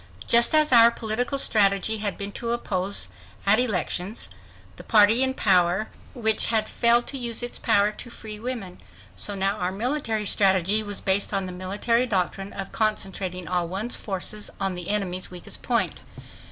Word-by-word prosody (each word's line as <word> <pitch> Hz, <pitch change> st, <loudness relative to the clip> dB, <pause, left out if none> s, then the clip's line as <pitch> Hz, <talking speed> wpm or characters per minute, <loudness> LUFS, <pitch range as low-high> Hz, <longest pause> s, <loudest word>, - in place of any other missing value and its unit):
Just 235 Hz, +5 st, +5 dB
as 305 Hz, -1 st, +5 dB
our 235 Hz, -1 st, +8 dB
political 235 Hz, +4 st, -3 dB
strategy 210 Hz, -2 st, +2 dB
had 205 Hz, -2 st, -3 dB
been 200 Hz, 0 st, -6 dB
to 235 Hz, +3 st, -4 dB
oppose, 195 Hz, -, -2 dB, 0.4 s
at 205 Hz, +3 st, +4 dB
elections, 205 Hz, -, -2 dB, 0.5 s
the -, -, -11 dB
party 215 Hz, +2 st, +4 dB
in 260 Hz, 0 st, +2 dB
power 180 Hz, +1 st, +2 dB, 0.3 s
which 220 Hz, -3 st, +4 dB
had 220 Hz, -2 st, 0 dB
failed 235 Hz, 0 st, +3 dB
to 275 Hz, -, -4 dB
use 235 Hz, -1 st, -2 dB
its 240 Hz, -, -2 dB
power 205 Hz, +1 st, +2 dB
to 230 Hz, +3 st, -10 dB
free 215 Hz, -2 st, -10 dB
women, 225 Hz, -6 st, -6 dB, 0.4 s
so 205 Hz, -, +1 dB
now 195 Hz, +1 st, -1 dB
our 180 Hz, -1 st, -2 dB
military 225 Hz, 0 st, -2 dB
strategy 195 Hz, +1 st, +2 dB
was 205 Hz, -2 st, 0 dB
based 200 Hz, +1 st, +1 dB
on 195 Hz, -1 st, -1 dB
the 185 Hz, -, -7 dB
military 205 Hz, +7 st, -1 dB
doctrine 195 Hz, -1 st, -2 dB
of 195 Hz, -1 st, -7 dB
concentrating 190 Hz, -4 st, -2 dB
all 180 Hz, -1 st, -1 dB
one's 200 Hz, +7 st, 0 dB
forces 205 Hz, +1 st, -5 dB
on 195 Hz, -1 st, -1 dB
the 180 Hz, -1 st, -6 dB
enemy's 185 Hz, -3 st, -2 dB
weakest 180 Hz, -1 st, -8 dB
point. -, -, -1 dB
210 Hz, 165 wpm, -24 LUFS, 190-230 Hz, 0.5 s, our